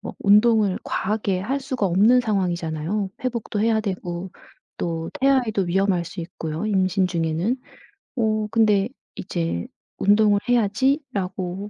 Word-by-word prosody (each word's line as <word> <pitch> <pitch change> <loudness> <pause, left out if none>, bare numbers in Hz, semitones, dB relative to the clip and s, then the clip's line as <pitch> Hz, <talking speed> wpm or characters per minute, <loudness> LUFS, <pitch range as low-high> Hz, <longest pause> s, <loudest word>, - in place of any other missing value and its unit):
뭐 - - -7
운동을 210 -1 +4
과하게 200 -2 -1
할 265 +8 -1
수가 260 -7 -2
없는 210 +8 +4
상황이잖아요. 185 -2 -1
회복도 235 -4 -2
해야 220 0 +2
되고 185 -3 -4 0.5
또 165 -1 -3
태아에도 255 -7 +2
위험할 185 0 +1
수 170 +2 -7
있고요 165 0 -5
임신 190 -2 +1
중에는. 170 +7 -1 0.6
어. 215 -2 +1
근데 215 -2 +3 0.2
이제 165 - -3 0.3
'운동을 205 0 +4
해야지.'라고 205 - 0
200 Hz, 280 characters per minute, -23 LUFS, 180-220 Hz, 0.6 s, 운동을